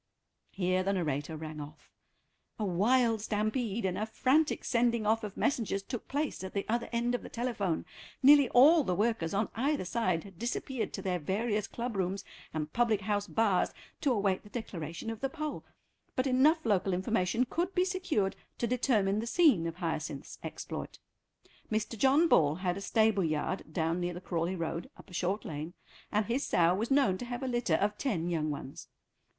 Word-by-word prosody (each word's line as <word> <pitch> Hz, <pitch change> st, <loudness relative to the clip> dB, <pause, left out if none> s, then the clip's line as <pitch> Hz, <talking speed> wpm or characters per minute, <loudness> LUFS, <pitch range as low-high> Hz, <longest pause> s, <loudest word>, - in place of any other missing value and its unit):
Here 185 Hz, -1 st, 0 dB
the 195 Hz, +1 st, 0 dB
narrator 155 Hz, -3 st, -2 dB
rang 155 Hz, -1 st, -6 dB
off. 145 Hz, +1 st, -12 dB, 0.7 s
A 215 Hz, -, -1 dB
wild 225 Hz, +5 st, +3 dB
stampede 215 Hz, +1 st, -1 dB
and 185 Hz, 0 st, -1 dB
a 215 Hz, -, -1 dB
frantic 280 Hz, +7 st, +2 dB
sending 235 Hz, -2 st, +2 dB
off 220 Hz, +2 st, +2 dB
of 210 Hz, -2 st, -6 dB
messengers 220 Hz, -7 st, 0 dB
took 245 Hz, +2 st, -6 dB
place 290 Hz, -6 st, -2 dB
at 190 Hz, -, -6 dB
the 200 Hz, -, -1 dB
other 235 Hz, +1 st, -1 dB
end 240 Hz, +1 st, 0 dB
of 245 Hz, -, -1 dB
the -, -, -9 dB
telephone. 225 Hz, -8 st, -2 dB, 0.4 s
Nearly 280 Hz, -1 st, +8 dB
all 295 Hz, +6 st, +7 dB
the 180 Hz, -, 0 dB
workers 210 Hz, -4 st, 0 dB
on 210 Hz, +2 st, +1 dB
either 275 Hz, 0 st, 0 dB
side 185 Hz, -4 st, 0 dB
had 195 Hz, -4 st, -14 dB
disappeared 240 Hz, +1 st, -2 dB
to -, -, -5 dB
their 180 Hz, -2 st, 0 dB
various 210 Hz, +6 st, -1 dB
club 240 Hz, -1 st, -4 dB
rooms 195 Hz, +1 st, -2 dB, 0.3 s
and 155 Hz, -1 st, -4 dB
public 230 Hz, -4 st, +2 dB
house 205 Hz, 0 st, -1 dB
bars 210 Hz, -5 st, +2 dB, 0.3 s
to 285 Hz, -, +1 dB
await 200 Hz, -5 st, +1 dB
the 205 Hz, -, -15 dB
declaration 185 Hz, -3 st, -5 dB
of 225 Hz, -, -6 dB
the 270 Hz, -, 0 dB
poll, 305 Hz, +1 st, -4 dB, 0.5 s
but 255 Hz, -, +1 dB
enough 280 Hz, +5 st, +4 dB
local 195 Hz, -3 st, +2 dB
information 220 Hz, +4 st, +1 dB
could 350 Hz, +8 st, -2 dB
be 360 Hz, 0 st, +3 dB
secured 365 Hz, -, 0 dB, 0.2 s
to -, -, 0 dB
determine 220 Hz, -5 st, +2 dB
the 230 Hz, -, -3 dB
scene 235 Hz, -, +4 dB
of 165 Hz, -, -4 dB
Hyacinth's 160 Hz, -5 st, -4 dB
exploit. -, -, -6 dB, 0.7 s
Mr. 215 Hz, +1 st, -1 dB
John 275 Hz, +8 st, +4 dB
Ball 150 Hz, -, +4 dB
had 180 Hz, 0 st, -1 dB
a 200 Hz, -, -6 dB
stable 215 Hz, -1 st, +2 dB
yard 155 Hz, +4 st, -2 dB
down 165 Hz, 0 st, 0 dB
near 175 Hz, 0 st, -2 dB
the -, -, -5 dB
Crawleigh 175 Hz, 0 st, -2 dB
Road, 165 Hz, 0 st, -3 dB
up -, -, -15 dB
a -, -, -12 dB
short 190 Hz, +4 st, -1 dB
lane, 155 Hz, +3 st, -5 dB, 0.4 s
and 210 Hz, 0 st, +2 dB
his 245 Hz, +6 st, 0 dB
sow 170 Hz, 0 st, +3 dB
was 215 Hz, +5 st, -1 dB
known 270 Hz, -10 st, +3 dB
to -, -, -5 dB
have 245 Hz, +1 st, -5 dB
a -, -, -1 dB
litter 240 Hz, -9 st, +1 dB
of 205 Hz, +4 st, 0 dB
ten 175 Hz, -10 st, -1 dB
young 155 Hz, -2 st, 0 dB
ones. 140 Hz, -2 st, -6 dB
210 Hz, 190 wpm, -31 LUFS, 180-245 Hz, 0.7 s, Nearly